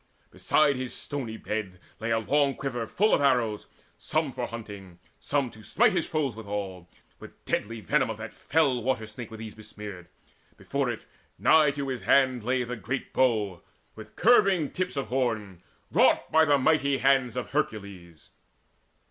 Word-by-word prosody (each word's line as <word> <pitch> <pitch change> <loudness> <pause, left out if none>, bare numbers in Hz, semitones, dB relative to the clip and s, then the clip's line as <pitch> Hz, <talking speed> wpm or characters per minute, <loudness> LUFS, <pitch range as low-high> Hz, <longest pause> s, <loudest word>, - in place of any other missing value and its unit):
Beside 145 -3 +2
his 130 -1 -4
stony 125 -6 -5
bed 105 -5 -4 0.2
Lay 110 +1 -3
a 115 - +2
long 140 +5 +1
quiver 120 -5 -4
full 215 +3 +2
of - - +3
arrows, 120 -6 +1 0.3
some 155 -3 -1
For 125 -1 -4
hunting, 100 -6 -9 0.2
some 140 -4 -1
to 110 - -14
smite 105 - +3
his - - -1
foes 145 -7 -1
withal; 100 -5 -5 0.3
With - - -14
deadly 115 +1 -2
venom 135 +1 +1
of 110 - -4
that 110 +1 -8
fell 140 -6 +1
water 125 -2 -1
snake 110 +2 -9
Were 110 - -9
these 110 -1 -8
besmeared. 105 -4 -9 0.5
Before - - -2
it, - - -4 0.3
nigh 155 -2 +5
to 140 -1 -4
his 130 -4 -3
hand, 130 +3 +3
Lay 125 +2 +1
the 125 +1 -4
great 125 +5 -4
bow, 105 -8 +1 0.3
with - - -12
curving 195 - +4
tips 185 -4 -3
of 140 - -2
horn, 110 -8 -2 0.3
Wrought - - +3
by 160 0 +5
the 145 -2 +4
mighty 140 0 +2
hands 135 -3 +2
of 125 - -4
Hercules. 100 - -4
120 Hz, 165 wpm, -27 LUFS, 105-140 Hz, 0.5 s, nigh